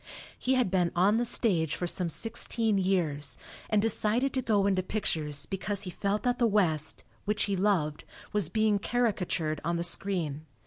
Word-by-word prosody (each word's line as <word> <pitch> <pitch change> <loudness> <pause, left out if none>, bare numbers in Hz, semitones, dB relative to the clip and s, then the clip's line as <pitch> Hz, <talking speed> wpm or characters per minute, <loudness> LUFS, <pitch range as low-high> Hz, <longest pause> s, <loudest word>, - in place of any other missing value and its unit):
He 260 +1 +1
had 250 -8 +1
been 180 -3 +2
on 195 +5 +4
the 240 - +1
stage 175 - +1
for 180 - -3
some 175 0 0
sixteen 225 +4 +1
years, 165 -7 0 0.3
and 215 - +3
decided 225 +4 +1
to 260 - 0
go 210 -5 +2
into 190 -2 +2
pictures 155 -7 -1
because 200 +1 -3
he 180 - -5
felt 200 +3 -2
that 245 0 0
the 240 - +4
West, 170 -8 +1 0.2
which 210 0 0
he 200 - 0
loved, 180 -6 0 0.3
was 205 -6 +1
being 215 +1 +2
caricatured 185 -10 -1
on 170 - -1
the 170 - -1
screen. 170 -5 -2
195 Hz, 175 wpm, -29 LUFS, 170-215 Hz, 0.3 s, on